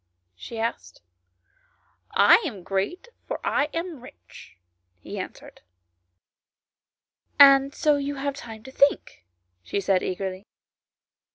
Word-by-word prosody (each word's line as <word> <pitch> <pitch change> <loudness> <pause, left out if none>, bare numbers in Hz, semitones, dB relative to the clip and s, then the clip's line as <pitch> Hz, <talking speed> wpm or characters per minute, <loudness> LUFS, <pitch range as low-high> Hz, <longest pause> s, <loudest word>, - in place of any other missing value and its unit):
" - - -53
she 230 - -9
asked. 90 - -5 0.6
" - - -39 0.2
I - - +8
am 205 - -6
great, 200 - -3 0.2
for - - -4
I 290 - +1
am 330 -4 -5
rich," 250 - -15 0.4
he - - -8
answered. - - -9
" 90 0 -52 1.5
And 275 0 +7
so 300 -1 +2
you 285 0 -3
have 280 +1 -3
time 225 -5 -10
to 265 - -11
think," 270 - +1 0.3
she 90 - -3
said 195 -1 +1
eagerly. 190 +1 -5
240 Hz, 125 wpm, -25 LUFS, 190-285 Hz, 1.5 s, I